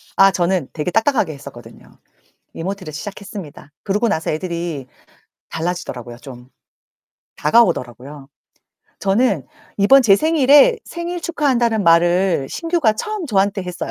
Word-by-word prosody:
아 195 0 +6
저는 180 -5 0
되게 160 +3 -3
딱딱하게 225 - +1
했었거든요. 140 -4 -13 0.6
이모티를 185 -2 -6
시작했습니다. 195 -5 -9
그러고 210 +4 0
나서 160 -6 -1
애들이 170 -4 -4 0.6
달라지더라고요, 145 -8 -5
좀. 125 -2 -12 0.9
다가오더라고요. 145 - 0 0.7
저는 195 - +1 0.3
이번 260 +7 +5
제 200 -5 +5
생일에 310 - +4
"생일 345 +1 -5
축하한다."는 245 - 0
말을 175 -2 +3
신규가 330 -10 0
처음 415 - -4
저한테 200 -4 0
했어요. 180 -1 -6
195 Hz, 325 characters per minute, -19 LUFS, 155-235 Hz, 0.9 s, 아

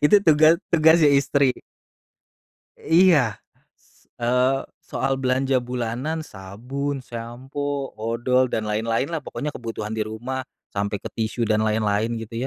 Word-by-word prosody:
Itu 205 +7 +6
tuga 155 0 +6 0.2
tugasnya 160 -1 +5
istri. 140 -1 +3 1.2
Iya, 160 - +4 0.4
s - - -30
eee, 125 +3 +2 0.2
soal 135 - -1
belanja 130 0 +1
bulanan 125 +6 -3
sabun, 125 +9 -5
sampo, 130 +4 -5
odol 120 +3 0
dan 110 -3 -2
lain-lain 115 +4 0
lah 160 - -3
pokoknya 150 0 -5
kebutuhan 110 -2 -5
di 110 - -1
rumah 120 +5 -4 0.3
sampai 100 0 -1
ke - - -11
tisu 115 +1 -1
dan 110 0 +2
lain-lain 110 +1 0
gitu 115 +1 -8
125 Hz, 125 wpm, -23 LUFS, 110-140 Hz, 1.2 s, Itu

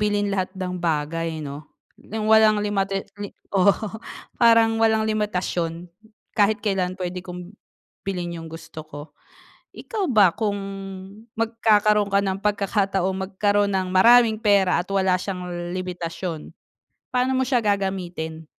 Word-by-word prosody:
bilhin 205 -1 0
lahat 185 -2 0
ng 180 -1 -4
bagay 160 0 -2
'no? 145 +2 -8 0.3
Nang 215 0 -5
walang 220 -1 +5
limata 195 -1 -1 0.2
li 205 - -4 0.2
oo, 195 0 +4 0.7
parang 225 -1 +5
walang 220 -1 +3
limitasyon 180 -5 -2 0.4
kahit 210 0 +2
kailan 185 -2 0
puwede 180 -1 -4
kong, 180 0 -9 0.5
bilhin 180 -3 -4
yung 165 - -9
gusto 165 0 -9
ko." 145 -1 -8 0.8
Ikaw 415 -5 -3
ba, 210 -7 +5
kung 210 -3 -1 0.8
magkakaroon 215 -2 +3
ka 200 0 +2
ng 190 0 -2
pagkakataong 195 -2 0
magkaroon 205 +1 +1
ng 185 -1 -1
maraming 230 +2 +6
pera 200 -5 +3
at 180 - -13
wala 190 -1 +2
siyang 180 -2 -5 0.3
limitasyon, 175 -2 -5 0.6
paano 250 +1 +1
mo 260 - +1
siya 255 -2 +2
gagamitin? 180 -6 -2
195 Hz, 130 wpm, -23 LUFS, 180-210 Hz, 0.8 s, maraming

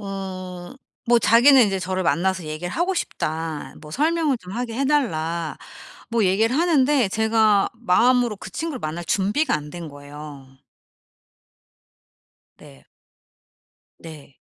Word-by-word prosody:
음. 185 0 -7 0.3
뭐 240 0 +5
자기는 240 +2 +6
이제 195 -1 -1
저를 185 +1 -2
만나서 185 +1 0
"얘기를 155 +3 -5
하고 350 +6 0
싶다." 160 - -4
뭐 150 - -12
"설명을 310 - +1
좀 180 -3 -11
하게 235 +1 -4
해 275 - +1
달라." 170 - -1 0.5
뭐 230 -2 +1
얘기를 220 +7 +2
하는데 295 - +3
제가 220 -1 +2
마음으로 240 +1 +2
그 - - -10
친구를 320 -5 -4
만날 160 +3 -4
준비가 205 - +1
안 150 -1 -4
된 170 0 -7
거예요. 145 -1 -11 2.1
네. 65 -1 -17 1.1
네. 150 -4 -13
195 Hz, 240 characters per minute, -22 LUFS, 165-245 Hz, 2.1 s, 자기는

